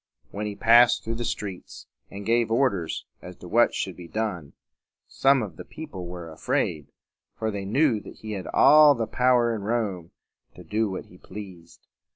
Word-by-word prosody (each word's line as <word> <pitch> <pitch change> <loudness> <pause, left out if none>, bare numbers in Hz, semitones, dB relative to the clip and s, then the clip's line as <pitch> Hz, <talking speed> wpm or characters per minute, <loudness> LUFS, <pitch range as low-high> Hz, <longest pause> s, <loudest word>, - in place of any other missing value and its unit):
When 105 +1 -4
he 105 - -5
passed 120 +3 +5
through 115 - -3
the - - -1
streets, 100 -4 -6 0.2
and 100 0 -8
gave 115 +1 +2
orders 115 -8 0 0.2
as - - -10
to - - -12
what - - +3
should - - -3
be 90 -1 -11
done, 90 -8 -4 0.5
some 135 -2 +3
of 100 - -8
the - - -8
people 100 - -9
were 85 -2 -8
afraid, 75 -1 -2 0.5
for 110 -1 -2
they 100 -1 -5
knew 125 +2 +2
that - - -12
he 110 - -9
had 95 -3 -5
all 150 -1 +6
power 125 -1 +2
in 110 - -4
Rome 100 -6 -2 0.5
to 90 - -12
do 105 +5 -1
what 95 - -6
he 90 - -18
pleased. 95 -4 -11
105 Hz, 180 wpm, -25 LUFS, 90-120 Hz, 0.5 s, all